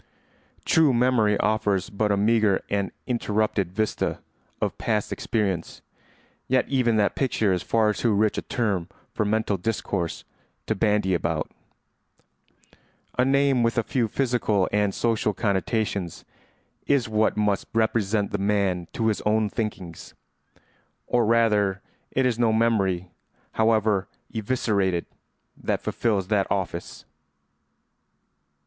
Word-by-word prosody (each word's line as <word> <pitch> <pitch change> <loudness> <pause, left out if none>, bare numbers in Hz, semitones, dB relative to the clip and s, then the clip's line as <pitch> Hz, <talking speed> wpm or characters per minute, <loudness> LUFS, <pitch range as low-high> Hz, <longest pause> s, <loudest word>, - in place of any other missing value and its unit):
True 155 -6 +4
memory 120 -4 +3
offers 105 -2 0
but 105 +1 0
a 100 - +2
meagre 105 -1 +2
and 100 -1 0
interrupted 105 -5 0
vista 110 +3 -1 0.4
of - - -1
past 105 -3 -1
experience, 95 -7 -2 0.6
yet 130 0 +2
even 125 -4 +2
that 105 -1 +2
picture 110 -7 +1
is 90 - -1
far 110 -2 +2
too 115 +2 0
rich 105 +1 +2
a - - -2
term 100 -8 -2 0.2
for 105 - 0
mental 105 -1 0
discourse 95 -3 -3 0.4
to - - 0
bandy 105 -2 +1
about; 80 -2 -1 1.7
a - - +6
name 135 -1 +3
with 115 +1 +1
a 115 - +2
few 120 +1 0
physical 110 -6 +1
and 105 -2 +1
social 110 -3 0
connotations 100 -3 -1 0.6
is 140 -4 +2
what 110 -1 +1
must 105 -2 0
represent 110 -2 +1
the 105 - -2
man 100 -4 0
to 115 - -1
his 110 -2 +1
own 105 0 +1
thinkings. 95 -7 -5 0.9
Or 120 -3 +1
rather 105 -4 +2 0.3
it 130 - +1
is 120 -2 0
no 115 -2 +3
memory, 100 -6 +1 0.4
however 110 -3 +2 0.3
eviscerated, 100 -6 0 0.5
that - - -1
fulfils 100 -5 -1
that 100 -3 +2
office. 90 -3 -3
105 Hz, 125 wpm, -25 LUFS, 100-115 Hz, 1.7 s, a